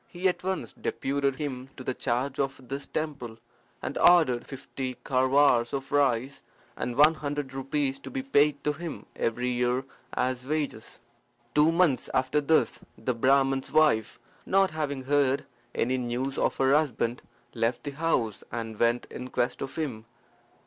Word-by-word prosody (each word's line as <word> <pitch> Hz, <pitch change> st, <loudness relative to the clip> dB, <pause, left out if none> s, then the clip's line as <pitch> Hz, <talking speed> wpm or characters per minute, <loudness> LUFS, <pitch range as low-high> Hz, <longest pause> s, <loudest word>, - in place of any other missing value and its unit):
He 180 Hz, +2 st, -1 dB
at 180 Hz, -, -1 dB
once 190 Hz, 0 st, -3 dB
deputed 140 Hz, 0 st, -1 dB
him 135 Hz, -3 st, -5 dB
to 130 Hz, -, -7 dB
the 130 Hz, -, -1 dB
charge 130 Hz, +3 st, -1 dB
of 135 Hz, -2 st, -3 dB
this 140 Hz, +1 st, -5 dB
temple, 140 Hz, -8 st, -4 dB, 0.5 s
and -, -, -3 dB
ordered 160 Hz, -9 st, +5 dB
fifty 130 Hz, -1 st, -5 dB
kharwars 130 Hz, -2 st, +3 dB
of 135 Hz, -1 st, -4 dB
rice 135 Hz, -2 st, +1 dB, 0.3 s
and 120 Hz, -, -3 dB
one 150 Hz, +4 st, +7 dB
hundred 145 Hz, -3 st, -4 dB
rupees 135 Hz, 0 st, -1 dB
to -, -, -9 dB
be 270 Hz, -1 st, -4 dB
paid 145 Hz, -, +3 dB
to 150 Hz, -, +1 dB
him 165 Hz, +1 st, -7 dB
every 120 Hz, +2 st, -1 dB
year 125 Hz, +1 st, +1 dB, 0.3 s
as 130 Hz, 0 st, -1 dB
wages. 145 Hz, -8 st, -3 dB, 0.5 s
Two 150 Hz, +2 st, +5 dB
months 165 Hz, -6 st, +2 dB
after 130 Hz, +3 st, +2 dB
this, 155 Hz, +2 st, +2 dB, 0.2 s
the 125 Hz, -, -1 dB
Brahman's 135 Hz, +2 st, +2 dB
wife, 150 Hz, -9 st, +3 dB, 0.3 s
not 195 Hz, -1 st, +3 dB
having 145 Hz, -4 st, -3 dB
heard 140 Hz, 0 st, +2 dB, 0.3 s
any 130 Hz, +2 st, +1 dB
news 125 Hz, +2 st, -2 dB
of -, -, 0 dB
her 135 Hz, 0 st, +3 dB
husband, 125 Hz, -5 st, +1 dB, 0.3 s
left 115 Hz, +1 st, 0 dB
the 145 Hz, -, -4 dB
house 140 Hz, -8 st, -1 dB
and 115 Hz, -2 st, -5 dB
went 120 Hz, +1 st, +2 dB
in 125 Hz, -, -6 dB
quest 125 Hz, -1 st, -1 dB
of 135 Hz, -, -5 dB
him. 130 Hz, -9 st, -3 dB
135 Hz, 155 wpm, -28 LUFS, 125-150 Hz, 0.5 s, one